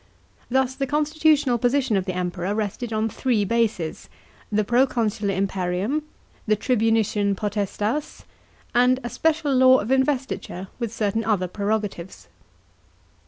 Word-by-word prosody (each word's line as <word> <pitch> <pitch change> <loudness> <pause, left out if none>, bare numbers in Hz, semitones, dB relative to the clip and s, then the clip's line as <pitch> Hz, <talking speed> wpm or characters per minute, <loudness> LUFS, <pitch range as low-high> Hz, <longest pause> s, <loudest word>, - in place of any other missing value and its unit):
Thus 260 +1 +1
the 275 0 -3
constitutional 300 -3 +2
position 250 -1 +1
of 190 -2 0
the 185 -2 -3
Emperor 180 +2 -2
rested 220 +2 -3
on 220 0 0
three 225 -2 0
bases: 220 -7 -1 0.4
the 215 0 +2
proconsular 225 -4 +1
imperium, 190 +7 -1 0.5
the 215 - +4
tribuniciaii 220 -3 +1
potestas, 210 +6 -2 0.5
and 250 +1 +4
a 240 - -3
special 320 -3 +1
law 260 0 +7
of 215 +5 -3
investiture 265 -8 -1
with 235 -3 -2
certain 225 -1 -1
other 200 -5 0
prerogatives. 200 -2 -3
225 Hz, 120 wpm, -23 LUFS, 200-260 Hz, 0.5 s, law